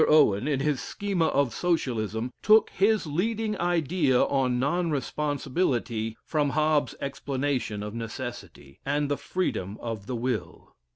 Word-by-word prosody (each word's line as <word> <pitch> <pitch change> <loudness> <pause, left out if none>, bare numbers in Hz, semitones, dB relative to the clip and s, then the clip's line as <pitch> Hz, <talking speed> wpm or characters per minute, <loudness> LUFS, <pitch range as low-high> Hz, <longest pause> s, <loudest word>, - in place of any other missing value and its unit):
Owen, 140 -7 +5
in 140 -3 +1
his 145 -3 0
schema 200 -5 -1
of 140 -4 +1
Socialism, 125 - -1
took 215 +1 +5
his 210 0 +2
leading 210 +8 -1
idea 165 -6 +2
on 130 -3 +1
non 170 +7 +1
responsibility 130 -5 -1
from 150 -2 +1
Hobbes's 155 -1 +2
explanation 135 -6 -2
of 105 0 -5
necessity, 115 - -7
and 145 +1 0
the 145 - +1
freedom 105 - -2
of 115 -4 -5
the 125 - -2
will. 120 -1 -4
140 Hz, 130 wpm, -27 LUFS, 120-160 Hz, -, Owen